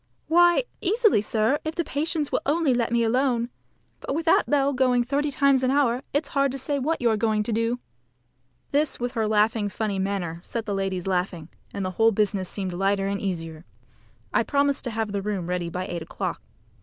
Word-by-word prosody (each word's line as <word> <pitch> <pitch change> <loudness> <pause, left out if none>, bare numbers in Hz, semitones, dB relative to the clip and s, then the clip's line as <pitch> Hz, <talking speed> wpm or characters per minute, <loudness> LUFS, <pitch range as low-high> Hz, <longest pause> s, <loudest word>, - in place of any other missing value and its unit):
"Why, 345 +5 +5 0.2
easily, 430 - +3
sir, 220 +6 +1
if 315 0 -4
the 340 - 0
patients 305 0 -2
will - - +1
only 300 -2 +2
let 235 -1 0
me 235 0 +2
alone. 240 0 +1 0.5
But 275 - -4
with 325 +1 -2
that 330 - +3
bell 280 -1 +2
going 250 -2 +3
thirty 285 +4 0
times 275 -1 +3
an 255 - +1
hour, 260 -3 +2
it's 290 0 -1
hard 275 -1 +1
to - - -3
say 280 +2 -1
what 315 +5 -1
you 235 - +4
are 220 - +1
going 215 0 +1
to 230 - -3
do." 230 +2 0 0.9
This 290 +1 +1
with 245 0 -2
her 215 -2 +3 0.2
funny 200 -1 -2
manner 185 -4 -2
set 230 -2 -4
the 205 - -2
ladies 195 -2 -2
laughing, 180 -3 -2 0.2
and 200 -1 -3
the 185 - -2
whole 225 0 +6
business 200 -3 0
seemed 190 -3 -4
lighter 195 +2 +1
and 200 0 -2
easier. 165 -4 -4 0.7
I - - +4
promised 280 -1 +1
to - - -1
have 220 -2 -2
the 200 -1 -2
room 195 -3 -3
ready 175 -1 -2
by 180 +2 -4
eight 175 -2 -5
o'clock. - - -4
230 Hz, 205 wpm, -25 LUFS, 195-280 Hz, 0.9 s, whole